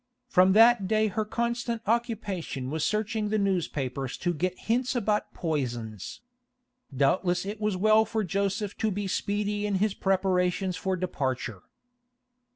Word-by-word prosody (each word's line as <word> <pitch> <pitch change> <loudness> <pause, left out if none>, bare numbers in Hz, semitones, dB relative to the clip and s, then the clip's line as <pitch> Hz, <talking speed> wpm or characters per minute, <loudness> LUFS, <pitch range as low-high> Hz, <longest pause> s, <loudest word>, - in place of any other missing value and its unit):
From 185 0 +5
that 225 -2 +6
day 215 +1 +2
her 215 +3 -1
constant 235 +1 -2
occupation 210 - -2
was 160 0 -1
searching 215 0 0
the 215 - +1
newspapers 145 - -1
to 175 -1 -1
get 180 +3 -2
hints 250 +3 0
about 210 -3 0
poisons. 120 - -3 0.8
Doubtless 175 +6 +2
it 205 +2 -5
was 210 -2 +1
as 185 - -5
well 215 +1 +6
for 220 0 -1
Joseph 200 +2 -1
to 220 - +1
be 205 0 -3
speedy 205 +2 -1
in 205 - 0
his 205 +1 +1
preparations 185 -1 +1
for 185 +3 -1
departure. 130 - -3
195 Hz, 145 wpm, -27 LUFS, 175-215 Hz, 0.8 s, that